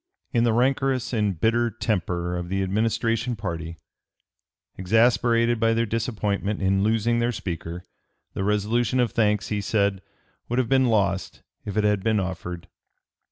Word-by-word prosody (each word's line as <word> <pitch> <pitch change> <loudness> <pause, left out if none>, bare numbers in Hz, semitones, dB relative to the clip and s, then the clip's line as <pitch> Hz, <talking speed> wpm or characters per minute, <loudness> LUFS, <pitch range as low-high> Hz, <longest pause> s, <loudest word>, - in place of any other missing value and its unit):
"In 120 -1 +3
the 115 - +3
rancorous 130 +1 +1
and 105 -6 0
bitter 120 +3 +2
temper 90 -6 -2
of 90 0 -4
the 95 +1 0
Administration 115 +4 0
party, 85 -4 -5 1.0
exasperated 115 +3 +2
by 115 0 +2
their 115 0 +1
disappointment 105 -2 -2
in 95 0 +1
losing 115 +2 +1
their 120 +1 +1
Speaker, 85 -4 -5 0.5
the - - -3
resolution 105 +4 +1
of 120 -2 +2
thanks," 105 -3 +1
he 105 -1 -1
said, 100 -2 0 0.5
"would 120 - -1
have 125 -3 +1
been 130 -1 +4
lost 100 -5 0 0.2
if 100 0 -5
it 105 - +3
had 105 -2 +1
been 110 -1 +2
offered." 90 -1 -5
105 Hz, 150 wpm, -24 LUFS, 95-115 Hz, 1.0 s, been